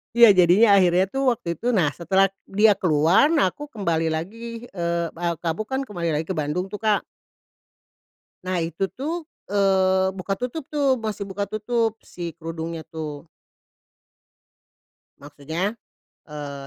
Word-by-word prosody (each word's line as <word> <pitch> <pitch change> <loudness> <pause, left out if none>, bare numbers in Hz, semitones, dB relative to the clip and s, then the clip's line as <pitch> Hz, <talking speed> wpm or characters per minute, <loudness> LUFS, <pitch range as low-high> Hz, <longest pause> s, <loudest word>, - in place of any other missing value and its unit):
Iya, 235 0 +9
jadinya 180 +6 +6
akhirnya 180 -1 +4
tuh 270 +7 -2
waktu 235 - -5
itu, 200 - -12
nah 185 -9 +3
setelah 190 +3 +3 0.2
dia 210 +1 +4
keluar, 175 - +3
nah 285 - +4
aku 290 - -6
kembali 165 -6 0
lagi, 230 +8 -5
eee, 170 -3 -2
a 170 -1 -2
kamu 165 +3 -2
kan 265 +5 -3
kembali 175 -5 -3
lagi 155 +1 -1
ke 190 - -2
Bandung 155 +4 -2
tuh, 205 +1 -7
Kak. 215 -2 +2 1.4
Nah 185 0 -1
itu 165 +3 -4
tuh, 320 +6 -3 0.3
eee, 190 -1 +3
buka 195 +1 -2
tutup 250 +9 -4
tuh, 280 -3 +2
masih 215 -3 -4
buka 200 +1 -2
tutup 220 +2 -1
si 170 -2 -7
kerudungnya 165 0 -5
tuh. 155 -1 -6 1.9
Maksudnya, 160 +8 -4 0.5
eee, 145 -2 -7
185 Hz, 140 wpm, -23 LUFS, 165-215 Hz, 1.9 s, Iya